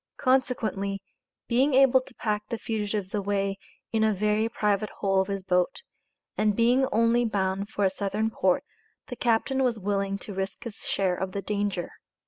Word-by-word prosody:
Consequently, 225 -7 0 0.5
being 260 +3 +3
able 265 -1 +6
to 255 -1 -16
pack 210 -1 -2
the 230 - -2
fugitives 210 -3 -3
away 200 -1 -1 0.3
in 220 -1 +2
a 215 -1 +3
very 210 +3 +1
private 210 -2 0
hole 195 -1 +1
of 190 - -2
his 195 -1 -3
boat, 180 - 0 0.5
and 210 -1 +2
being 245 +4 +3
only 230 0 +3
bound 200 -2 -1
for 205 - 0
a - - +4
Southern 210 +3 -1
port, 185 -4 +2 0.5
the 245 - -4
captain 245 +3 +1
was 245 -3 +1
willing 195 -1 -1
to 200 - -8
risk 190 0 -4
his 230 -4 -7
share 190 -2 +1
of 185 +1 -3
the 200 - -2
danger. 200 -4 -2
210 Hz, 170 wpm, -27 LUFS, 195-230 Hz, 0.5 s, able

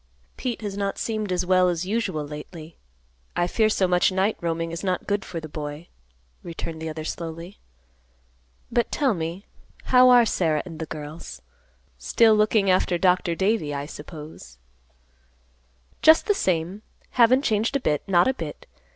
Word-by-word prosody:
"Pete 240 -3 -4
has 200 -2 -4
not 200 -1 -2
seemed 215 -3 -3
as 180 0 0
well 185 0 +4
as 175 0 -2
usual 195 -7 -2
lately. 155 +2 -9 0.6
I 175 +1 +2
fear 215 +4 +2
so 195 -3 +2
much 180 +1 +3
night 190 +3 +1
roaming 165 -1 -2
is 165 +3 -6
not 185 -2 -1
good 205 -1 -1
for 170 - -6
the 160 - -8
boy," 150 +2 -7 0.5
returned 165 -1 -7
the 160 - -4
other 155 0 -6
slowly. 165 +3 -6 1.1
"But 240 - +1
tell 275 -5 +1
me, 170 +2 -5 0.4
how 255 0 +6
are 245 -1 +7
Sarah 160 -8 0
and 165 -4 -9
the 160 - -4
girls? 155 +2 -8 0.6
Still 220 - +4
looking 210 -1 +3
after 185 -1 +2
Dr. 180 -1 +2
Davie, 190 -6 0
I 140 0 -3
suppose." 150 - -10 1.4
"Just 315 +1 +6
the 415 - +3
same; 185 - -1 0.3
haven't 250 +3 +4
changed 220 +3 0
a - - +3
bit; 150 - 0
not 180 +3 +4
a 260 - +2
bit. - - -7
180 Hz, 160 wpm, -24 LUFS, 160-215 Hz, 1.4 s, are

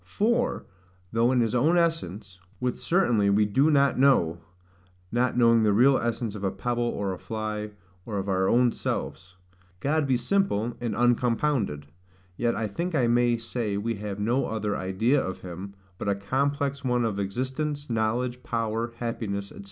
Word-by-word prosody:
For, 235 +4 0 0.5
though 115 +2 +3
in 125 -2 +3
his 115 -1 0
own 150 +8 +3
essence 105 - -1 0.2
(which 125 +2 -2
certainly 120 - +2
we 105 +1 +4
do 135 +9 +3
not 140 -3 +3
know, 85 -12 +3 0.7
not 125 +1 +1
knowing 115 -1 +5
the 105 -2 +3
real 130 +5 +5
essence 120 -2 -2
of 105 -2 -7
a 95 - +2
pebble, 120 +6 -2
or 100 -4 -2
a 90 - -8
fly, 110 -1 -4 0.3
or 105 0 -4
of 95 0 -3
our 95 -1 +1
own 120 0 +4
selves) 90 +4 -4 0.4
God 150 +3 +1
be 130 -2 +3
simple 120 - 0
and 120 -2 -2
uncompounded; 120 - +1 0.5
yet 120 +3 0
I 110 - -1
think 170 - -3
I 130 -5 +3
may 120 0 +3
say 115 -3 -3
we 115 +3 -1
have 105 -1 -5
no 120 +6 +1
other 110 -2 -2
idea 110 +9 +1
of 95 - -5
him, 95 +2 -8 0.2
but 100 - -2
a 100 - +2
complex 140 +6 -1
one 125 -2 +1
of 105 -3 -2
existence, 130 +8 -3
knowledge, 120 +2 -1
power, 115 0 -2
happiness, 100 -4 -3
&c. - - -14
115 Hz, 170 wpm, -26 LUFS, 100-130 Hz, 0.7 s, knowing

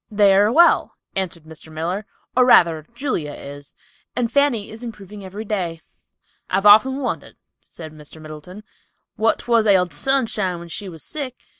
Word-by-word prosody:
"They 205 -2 +4
are 205 +3 +4
well," 340 +6 +4 0.2
answered 180 -4 -3
Mr. 160 0 -13
Miller, 175 +7 -4 0.3
"or 255 - +5
rather 165 -10 +4
Julia 240 - -3
is, 145 0 -10 0.4
and 240 -2 -1
Fanny 270 -6 +1
is 220 +2 -10
improving 210 -3 -9
every 200 +4 -7
day." 180 -6 -3 0.7
"I've 195 +2 0
often 220 +6 +7
wondered," 255 - -4 0.3
said 155 -2 -10
Mr. 155 +1 -13
Middleton, 155 +6 -11 0.5
"what 225 +1 +2
'twas 230 -2 +1
ailded 180 -5 +3
Sunshine 215 - 0
when 170 0 -10
she 195 +3 -6
was 165 -3 -10
sick. 270 -5 -7
195 Hz, 155 wpm, -21 LUFS, 165-230 Hz, 0.7 s, often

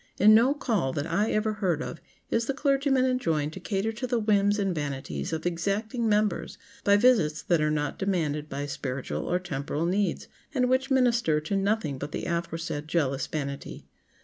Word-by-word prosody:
In 215 +2 +7
no 245 +6 +5
"call" 215 - 0
that 145 -1 -2
I 200 +6 +1
ever 215 0 +1
heard 185 -7 0
of 160 - -6 0.3
is 230 0 +1
the 275 - -1
clergyman 275 -2 +2
enjoined 165 - 0
to 190 - -7
cater 195 +3 -1
to 235 +3 -4
the 240 -1 +1
whims 205 -2 +2
and 195 -3 0
vanities 135 - -4
of 160 +1 -3
exacting 205 +7 -1
members 210 -2 0 0.3
by 200 0 +5
visits 205 -10 +3
that 170 -3 +2
are 150 - +2
not 150 -1 -2
demanded 155 -6 -1
by 140 +1 -3
spiritual 135 -2 -4
or 180 - +3
temporal 150 -2 -3
needs, 190 0 0 0.3
and 250 -1 +3
which 260 +1 +1
minister 235 - +3
to 160 +6 -2
nothing 195 -8 0
but 145 +2 -6
the - - -3
aforesaid 165 -3 -3
jealous 145 -5 0
vanity. 140 -2 -5
190 Hz, 180 wpm, -27 LUFS, 150-220 Hz, 0.3 s, In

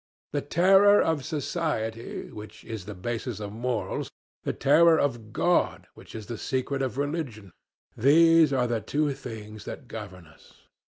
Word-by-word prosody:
The 145 - -1
terror 195 +7 +5
of 160 -4 +1
society, 145 -7 -3
which 105 0 -11
is 110 -5 -6
the 105 0 -7
basis 115 +3 -4
of 105 -1 -6
morals, 115 -4 -3 0.3
the - - -2
terror 160 +3 +5
of 120 -6 -2
God, 175 +7 +1
which - - -14
is 110 -1 -7
the 120 0 -6
secret 135 +1 -2
of 130 -1 -2
religion—these 145 - +1
are 130 -2 +2
the 120 -2 -1
two 145 +7 0
things 110 -3 -9
that 135 - -8
govern 100 -6 -8
us. 75 - -20
125 Hz, 150 wpm, -27 LUFS, 110-155 Hz, 0.3 s, terror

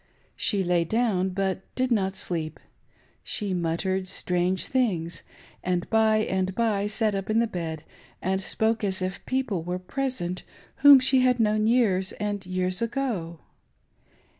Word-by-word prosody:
She 200 -3 +1
lay 175 -1 +2
down, 195 -1 +1
but 190 0 -1
did 255 0 0
not 195 -4 +1
sleep. 165 -5 -3 0.6
She 205 -3 -2
muttered 185 +2 -1
strange 180 0 0
things, 175 -11 -1 0.4
and 180 -1 -1
by 220 -1 +4
and 190 0 -1
by 210 -3 +1
sat 215 0 +1
up 195 0 -3
in 215 - +2
the 230 - +4
bed 165 -6 -5 0.4
and 190 +1 -1
spoke 220 +3 0
as 190 -2 -1
if 185 +1 -4
people 255 -9 -1
were 180 +2 -3
present 185 -3 -3 0.4
whom 285 -1 +9
she 260 +1 +3
had 250 -1 +3
known 215 -1 +2
years 205 -6 +2
and 205 -1 -3
years 185 +1 -1
ago. 225 - -2
195 Hz, 145 wpm, -26 LUFS, 180-225 Hz, 0.6 s, whom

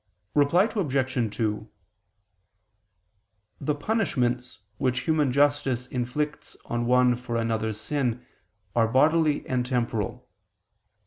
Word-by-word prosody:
Reply 145 +6 +4
Obj. 130 - -1
2: 110 -1 -2 1.9
The 145 +1 0
punishments 125 - -1 0.2
which 130 0 +1
human 155 -4 +1
justice 140 -3 +2
inflicts 145 +4 -3
on 120 0 -2
one 125 0 +4
for 120 -1 -5
another's 110 -2 -1
sin 125 -1 -2 0.5
are 115 -1 +4
bodily 150 +5 +3
and 125 -1 0
temporal. 115 -5 -2
125 Hz, 100 wpm, -26 LUFS, 120-145 Hz, 1.9 s, Reply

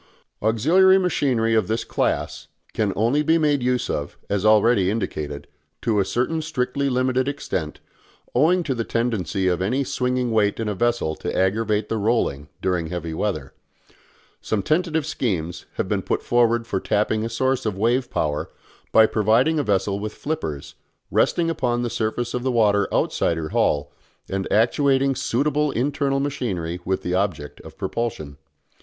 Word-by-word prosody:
Auxiliary 165 - +4
machinery 135 -11 +1
of 110 -4 +2
this 110 +1 -1
class - - -2 0.3
can 105 -3 0
only 120 +8 +2
be 160 +2 +3
made 150 -4 +2
use 125 0 0
of, 75 0 -4
as 100 -1 0
already 110 -2 +4
indicated, 75 -9 -3 0.4
to 110 -3 +2
a 100 - +2
certain 130 +10 -1
strictly 140 -3 -1
limited 130 0 +1
extent, 95 - -3 0.5
owing 170 +7 +3
to 140 - -1
the 115 -2 -2
tendency 110 -6 -1
of 90 -1 +1
any 125 +9 +1
swinging 125 -1 -1
weight 105 -1 +2
in 115 - -2
a 105 - -1
vessel 120 -6 0
to - - -4
aggravate 105 +2 +1
the 110 - -2
rolling 100 - 0
during 90 -3 0
heavy 85 -1 -4
weather. 80 -6 -3 0.9
Some 105 -3 -1
tentative 160 -1 +1
schemes 90 - -3
have - - -2
been - - 0
put - - -2
forward 120 -1 +2
for 100 -4 -2
tapping 105 +2 0
a 115 - -2
source 130 +3 0
of 100 -3 -2
wave 120 +4 +1
power 75 -1 -2 0.4
by 110 - +7
providing 115 +9 +2
a - - +1
vessel 100 -2 0
with 105 +1 -5
flippers, 80 - -4 0.4
resting 170 -1 +2
upon 120 -7 0
the 120 - -2
surface 120 +1 -2
of 125 - -2
the 130 - -1
water 105 -4 +3
outside 85 - +1
her 80 -1 -4
hull, 70 -1 +1 0.4
and 95 0 -3
actuating 135 +4 +3
suitable 145 +4 0
internal 140 +2 0
machinery 95 -12 -3
with 95 0 -1
the 90 - -2
object 90 -7 -2
of - - -13
propulsion. 115 -12 -4
115 Hz, 160 wpm, -23 LUFS, 95-130 Hz, 0.9 s, by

